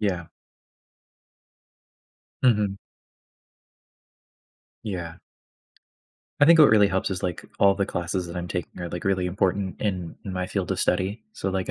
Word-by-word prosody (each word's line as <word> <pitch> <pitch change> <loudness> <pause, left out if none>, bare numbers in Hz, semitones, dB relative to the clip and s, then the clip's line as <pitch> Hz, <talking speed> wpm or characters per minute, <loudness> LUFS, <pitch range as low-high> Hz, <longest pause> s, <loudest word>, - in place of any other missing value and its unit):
Yeah. 90 -5 -1 2.2
Mhm. 105 -6 +3 2.1
Yeah. 85 -6 -4 1.3
I - - +8
think 165 +2 +7
what 150 - +9
really 105 -2 +6
helps 95 0 -1
is, 95 -2 -3
like, 90 -2 -3
all 100 0 +5
the 100 -1 -1
classes 90 +1 -2
that 85 +1 -7
I'm 90 0 -4
taking 90 +1 -5
are, 85 - -4
like, 90 +1 -6
really 95 -2 +1
important 95 +1 -1
in 90 -5 -2
in 95 - -5
my 90 0 -2
field 95 -2 -3
of - - -2
study, 95 +5 0
so, 95 - -3
like, 95 -1 -2
95 Hz, 145 wpm, -25 LUFS, 90-100 Hz, 2.2 s, what